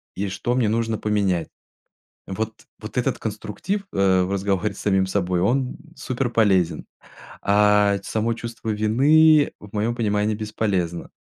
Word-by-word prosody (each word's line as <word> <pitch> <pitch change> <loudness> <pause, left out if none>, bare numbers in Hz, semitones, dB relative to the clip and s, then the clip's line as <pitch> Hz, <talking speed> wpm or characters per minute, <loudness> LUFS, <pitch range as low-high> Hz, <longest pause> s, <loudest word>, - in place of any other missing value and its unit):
и 100 +2 -2
что 110 +6 -2
мне 125 -3 +2
нужно 115 0 0
поменять. 100 -6 0 0.8
Вот, 110 +3 -5 0.2
вот 110 +3 -6
этот 125 0 0
конструктив, 110 - -4
э, 95 -1 +3
в 90 +2 -2
разговоре 100 +1 -1
с - - -13
самим 95 -2 +2
собой, 90 -2 0
он 125 +7 0 0.2
суперполезен, 110 -9 +1 0.6
а 105 0 +4
ть 95 - -18
само 110 +1 -1
чувство 115 -1 -6
вины, 145 +9 +4
в 105 -1 -13
моем 110 +3 0
понимании, 105 -2 0
бесполезно. 100 -5 -2
105 Hz, 140 wpm, -23 LUFS, 100-115 Hz, 0.8 s, а